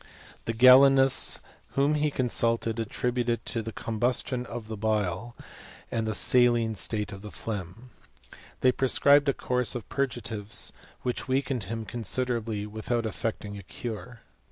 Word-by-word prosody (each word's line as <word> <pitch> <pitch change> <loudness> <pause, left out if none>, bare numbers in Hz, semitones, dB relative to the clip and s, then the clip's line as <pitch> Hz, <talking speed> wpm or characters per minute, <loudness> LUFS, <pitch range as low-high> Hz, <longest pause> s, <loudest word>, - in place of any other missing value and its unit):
The 115 - -1
Galenists 135 +2 +6 0.3
whom 140 +2 +2
he 150 0 +1
consulted, 115 -3 0
attributed 120 +1 -1
it - - -37
to 115 - -1
the 115 0 -6
combustion 120 +3 -1
of 115 -2 -7
the 110 - -5
bile, 105 +1 -1 0.6
and 115 -1 -1
the 110 - -1
saline 120 -2 +4
state 105 0 -2
of 95 -1 -9
the 105 - -8
phlegm. 105 +3 -7 0.7
They 130 - +5
prescribed 140 +2 +4
a - - +3
course 125 0 -1
of 120 - -5
purgatives 115 -6 -1 0.3
which 125 - -3
weakened 130 -4 -1
him 115 +3 -5
considerably, 115 -2 -2
without 110 +2 -2
effecting 105 -2 -4
a - - -8
cure. 115 +4 -7
115 Hz, 140 wpm, -27 LUFS, 110-125 Hz, 0.7 s, Galenists